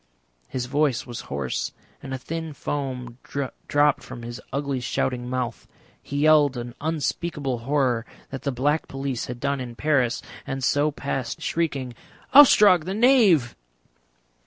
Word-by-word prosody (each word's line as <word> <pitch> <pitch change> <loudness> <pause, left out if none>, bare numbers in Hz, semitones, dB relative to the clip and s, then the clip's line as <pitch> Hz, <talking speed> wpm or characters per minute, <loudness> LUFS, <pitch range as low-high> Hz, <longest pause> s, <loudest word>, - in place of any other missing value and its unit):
His 125 -1 -3
voice 140 -1 +1
was 120 -2 -6
hoarse 70 -2 -2 0.3
and 135 - -8
a 130 - -2
thin 160 +3 -5
foam 130 -4 -4
dropped 145 +1 0
from 120 - -9
his 120 0 -7
ugly 140 -1 -1
shouting 125 0 -2
mouth. 125 -2 -3 0.3
He 140 +1 -3
yelled 150 -3 +5
an 120 0 -5
unspeakable 150 -3 -2
horror 125 -2 0 0.2
that 135 - -5
the 140 - -1
Black 145 +5 0
Police 135 -2 -3
had 125 -1 -6
done 140 0 -1
in 120 -2 -7
Paris, 135 -4 +1 0.2
and 135 -1 -3
so 145 +3 +3
passed 140 -4 -4
shrieking, 140 -7 -1 0.4
"Ostrog 210 - +8
the 190 +2 -3
Knave!" 215 - +4
135 Hz, 140 wpm, -24 LUFS, 125-150 Hz, 0.4 s, Ostrog